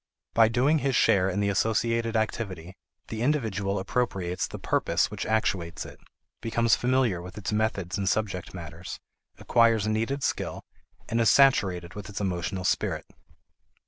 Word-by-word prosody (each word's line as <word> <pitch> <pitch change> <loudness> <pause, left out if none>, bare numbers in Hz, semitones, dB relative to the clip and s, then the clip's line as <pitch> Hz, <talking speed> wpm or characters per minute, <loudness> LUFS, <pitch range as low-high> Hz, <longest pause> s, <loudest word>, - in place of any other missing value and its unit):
By 115 -1 +6
doing 130 +7 +2
his 135 -1 0
share 95 -4 +4
in 95 +2 -1
the 100 - +1
associated 115 +3 +1
activity, 95 -5 -2 0.3
the 110 0 -4
individual 110 -8 0
appropriates 95 -4 -1
the - - -7
purpose - - 0
which - - -4
actuates 95 -6 -1
it, - - -12 0.4
becomes 115 0 +2
familiar 125 -7 +1
with 90 +3 -10
its 105 - -3
methods 105 -4 -1
and 95 -1 +1
subject 100 -5 -2
matters, 85 0 -8 0.4
acquires 115 -3 +3
needed 115 +6 -1
skill, - - -2 0.4
and 115 - 0
is 115 - +5
saturated 95 -11 +3
with 105 0 -8
its 100 - -5
emotional 95 -1 -2
spirit. - - 0
105 Hz, 145 wpm, -27 LUFS, 95-115 Hz, 0.4 s, By